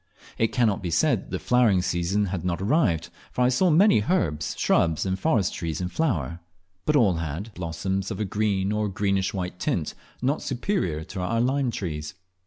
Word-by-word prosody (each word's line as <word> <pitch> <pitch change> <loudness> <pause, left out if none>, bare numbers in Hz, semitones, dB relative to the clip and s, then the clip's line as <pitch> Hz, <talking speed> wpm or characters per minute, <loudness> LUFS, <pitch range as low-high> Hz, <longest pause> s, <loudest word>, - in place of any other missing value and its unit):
It 115 - +4
cannot 110 -6 +1
be 90 - -3
said 85 - +2
that - - -17
the - - -2
flowering 115 -7 +3
season 90 +5 0
had 90 -3 -3
not 90 -1 -1
arrived, 95 - +1 0.2
for 125 - 0
I 125 - +4
saw 175 +9 +3
many 175 - +5
herbs, 80 - 0
shrubs, 80 0 +2
and 95 0 -1
forest 110 - +1
trees 80 -2 -3
in 90 -1 -2
flower, 85 - -1 0.5
but 150 - +3
all 105 - +4
had 85 +7 -5
blossoms 95 +3 -3
of - - -5
a 105 - 0
green 100 -1 0
or 105 0 0
greenish 100 -1 0
white 90 -2 -4
tint, 80 -4 -1 0.3
not 135 +5 0
superior 125 - -1
to 95 +3 -7
our 115 +6 0
lime 130 +2 +1
trees. 75 -8 -4
95 Hz, 190 wpm, -25 LUFS, 85-120 Hz, 0.5 s, many